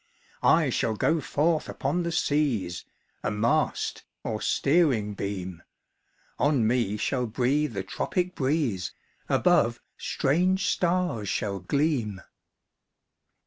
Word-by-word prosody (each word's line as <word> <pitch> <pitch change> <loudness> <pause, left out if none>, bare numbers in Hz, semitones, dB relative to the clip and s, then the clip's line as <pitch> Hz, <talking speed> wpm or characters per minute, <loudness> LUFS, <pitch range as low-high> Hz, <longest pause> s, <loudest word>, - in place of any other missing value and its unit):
"I - - +4
shall 110 - 0
go 160 +9 +2
forth 155 +4 0
upon 150 +5 -1
the 170 0 -2
seas, 135 - 0 0.4
A - - -1
mast, 105 +2 0 0.2
or 110 -1 -3
steering 135 -9 +2
beam; 95 -4 -5 0.8
On 145 -6 +3
me 115 -3 +1
shall 125 +3 -1
breathe 130 +4 0
the 95 -1 -3
tropic 180 - -2
breeze, 130 - -1 0.4
Above, - - +3 0.2
strange 185 +7 +1
stars 175 - 0
shall 100 -2 -1
gleam.' 120 - 0
130 Hz, 105 wpm, -27 LUFS, 105-155 Hz, 0.8 s, I